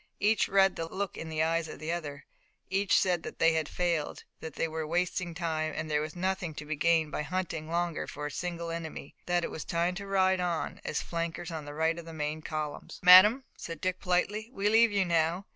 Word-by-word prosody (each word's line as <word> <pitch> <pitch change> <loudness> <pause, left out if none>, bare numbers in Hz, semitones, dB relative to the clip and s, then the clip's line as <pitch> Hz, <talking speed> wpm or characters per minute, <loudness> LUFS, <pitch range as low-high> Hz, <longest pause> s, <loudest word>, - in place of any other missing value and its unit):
Each 215 +1 +3
read 195 -1 +4
the 165 - -3
look 190 +2 -4
in 165 - -6
the 155 0 0
eyes 165 0 0
of - - -8
the 155 +1 -4
other. 145 -4 -5 0.5
Each 195 0 +3
said 180 -3 +1
that - - -8
they 165 0 +4
had 160 -2 -1
failed, 170 -4 -1 0.2
that 160 - -8
they - - 0
were 160 -1 -4
wasting 175 +1 -1
time, 160 -2 -2
that 155 - -3
there 150 -1 +1
was 155 +2 -5
nothing 180 -3 -2
to 150 - -7
be 155 +1 -2
gained 160 0 +2
by - - -2
hunting 160 -1 -3
longer 170 -1 -1
for 145 - -6
a 150 - -3
single 170 +1 -4
enemy, 165 -4 -6
that 175 -1 +1
it - - -3
was 160 - -5
time 170 +1 0
to 200 +2 -7
ride 190 -1 +3
on, 175 -2 -2
as - - -2
flankers 170 0 -4
on 160 -2 -5
the 145 0 -8
right 160 +2 +1
of 170 - -9
the 165 - -9
main 155 0 -3
column. 155 -2 -4 0.2
"Madame," 195 +8 +9
said 165 -2 -7
Dick 185 +2 -1
politely, 205 +5 0
"we 205 -4 0
leave 225 +1 +5
you 200 -2 +2
now. 170 +2 +1
170 Hz, 230 wpm, -30 LUFS, 155-185 Hz, 0.5 s, Madame